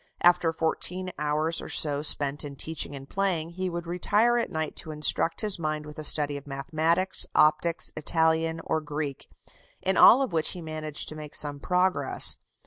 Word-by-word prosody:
After 175 -1 +4
fourteen 180 +3 -2
hours 155 +2 -1
or - - -9
so 145 -2 0
spent 145 -1 +4
in 145 -1 -8
teaching 155 0 -2
and 135 0 -10
playing, 175 -4 -2
he 185 +1 -4
would 170 0 -6
retire 205 +7 +1
at 235 - -2
night 160 -1 -4
to 160 - -3
instruct 155 +2 +1
his 210 -4 +1
mind 155 -1 -3
with 150 0 -11
a - - -6
study 145 -1 +3
of 140 - -12
mathematics, 160 +6 -1
optics, 155 +2 +2
Italian, 160 +1 0
or 160 - -1
Greek, 150 -2 -6 0.5
in 190 -1 -1
all 265 +3 +7
of 255 - -5
which 160 -2 +1
he 180 - -8
managed 155 -1 -4
to 155 - -7
make 150 -1 -8
some 145 -1 0
progress. 180 -5 +1
160 Hz, 180 wpm, -26 LUFS, 150-175 Hz, 0.5 s, all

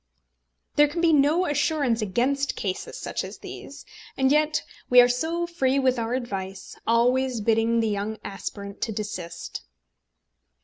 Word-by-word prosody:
_" - - -45
There 295 0 +7
can 310 +4 -4
be 335 -1 +4
no 300 +5 +4
assurance 290 -6 +1
against 255 +7 0
cases 190 -2 -4
such - - -3
as - - -8
these; - - -10 0.3
and 265 0 +3
yet 305 +1 +2 0.3
we 250 - +8
are 245 - +8
so 320 +8 -1
free 275 -6 0
with 260 -2 +2
our 230 +2 -1
advice, 195 -6 -5
always 245 +2 +2
bidding 225 +2 +2
the 225 - +1
young 210 +1 -2
aspirant 200 0 -7
to 225 - -1
desist. 185 -5 -5
245 Hz, 150 wpm, -25 LUFS, 215-285 Hz, 0.3 s, we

